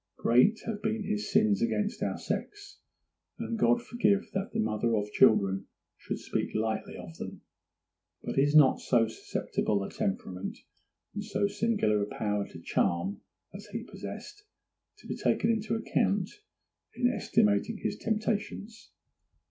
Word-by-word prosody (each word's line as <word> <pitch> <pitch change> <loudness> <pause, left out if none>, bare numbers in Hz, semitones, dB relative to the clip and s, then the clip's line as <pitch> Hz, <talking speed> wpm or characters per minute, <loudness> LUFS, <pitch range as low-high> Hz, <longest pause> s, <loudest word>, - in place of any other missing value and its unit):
Great 125 - +4
have 215 -2 -3
been 220 0 -1
his 210 +1 -2
sins 215 0 +4
against 210 -3 0
our - - -1
sex, 405 -1 -5 0.6
and 230 - -3
God 240 +2 +3
forbid 205 -5 +2
that 195 +1 -2
the 225 - -2
mother 115 - +1
of 105 0 -1
children 95 -3 +4 0.3
should - - -5
speak - - -3
lightly 110 0 -1
of 80 - -9
them; - - -7 0.8
but - - -3
is 145 +2 +3
not 145 -4 +7
so 115 -3 +3
susceptible 105 -2 -2
a - - -6
temperament, 95 -1 -3 0.6
and - - -4
so - - 0
singular 205 - +1
a 100 - -1
power 105 -1 -1
to 80 - -11
charm 85 +3 0 0.3
as 205 +3 -9
he 225 +3 -5
possessed, 415 - -8 0.5
to - - -19
be - - -3
taken 225 - +2
into 220 0 0
account 200 -3 +1 0.6
in 245 - +3
estimating 105 - +2
his - - -2
temptations? 220 0 -3
200 Hz, 145 wpm, -30 LUFS, -, 0.8 s, not